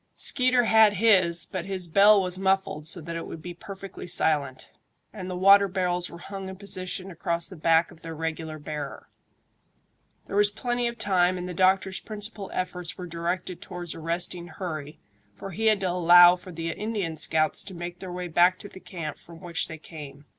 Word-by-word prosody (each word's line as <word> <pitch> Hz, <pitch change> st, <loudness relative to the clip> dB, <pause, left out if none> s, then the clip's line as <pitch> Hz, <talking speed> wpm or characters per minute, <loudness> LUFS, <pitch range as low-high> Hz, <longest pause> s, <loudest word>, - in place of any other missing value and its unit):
Skeeter 255 Hz, -2 st, +4 dB
had 220 Hz, -2 st, +5 dB
his, 185 Hz, -5 st, +4 dB
but 185 Hz, -2 st, -5 dB
his 190 Hz, -2 st, -4 dB
bell 200 Hz, +5 st, +6 dB
was 185 Hz, -1 st, -1 dB
muffled 190 Hz, -5 st, 0 dB
so 175 Hz, +1 st, -1 dB
that 170 Hz, +2 st, -6 dB
it 165 Hz, -, -5 dB
would 165 Hz, -, -8 dB
be 175 Hz, -, -6 dB
perfectly 195 Hz, +1 st, -9 dB
silent, 150 Hz, -6 st, 0 dB, 0.4 s
and 190 Hz, -4 st, -7 dB
the 180 Hz, -, -4 dB
water 200 Hz, +2 st, +6 dB
barrels 180 Hz, -2 st, -1 dB
were 170 Hz, -, -10 dB
hung 195 Hz, +2 st, -7 dB
in 190 Hz, -, -7 dB
position 185 Hz, -1 st, -4 dB
across 170 Hz, 0 st, -2 dB
the 190 Hz, -, -10 dB
back 165 Hz, +1 st, +2 dB
of 165 Hz, -, -17 dB
their 165 Hz, -1 st, -7 dB
regular 160 Hz, 0 st, -4 dB
bearer. 150 Hz, -1 st, -7 dB, 1.2 s
There -, -, -6 dB
was 205 Hz, 0 st, +5 dB
plenty 240 Hz, +3 st, -2 dB
of 235 Hz, 0 st, -5 dB
time, 185 Hz, -3 st, +2 dB
and 180 Hz, 0 st, -5 dB
the 180 Hz, -, -5 dB
doctor's 190 Hz, +1 st, +2 dB
principal 210 Hz, -2 st, -7 dB
efforts 180 Hz, -2 st, -4 dB
were 180 Hz, -, -6 dB
directed 175 Hz, +1 st, -4 dB
towards 175 Hz, -2 st, -6 dB
arresting 170 Hz, +2 st, -3 dB
hurry, 155 Hz, -4 st, -6 dB, 0.4 s
for 195 Hz, -, -8 dB
he 220 Hz, +6 st, -1 dB
had 215 Hz, -2 st, +4 dB
to 185 Hz, -, 0 dB
allow 175 Hz, 0 st, +7 dB
for 180 Hz, +1 st, -11 dB
the 165 Hz, 0 st, -4 dB
Indian 205 Hz, -5 st, -3 dB
scouts 155 Hz, 0 st, +1 dB
to 190 Hz, -, -9 dB
make 175 Hz, +1 st, -7 dB
their 185 Hz, -2 st, -7 dB
way 180 Hz, 0 st, -5 dB
back 175 Hz, +2 st, +4 dB
to 205 Hz, -, -5 dB
the 190 Hz, -, -12 dB
camp 165 Hz, -6 st, -7 dB
from 165 Hz, -1 st, -14 dB
which 170 Hz, -2 st, -2 dB
they 160 Hz, -, -8 dB
came. 145 Hz, -3 st, -11 dB
180 Hz, 195 wpm, -26 LUFS, 165-195 Hz, 1.2 s, allow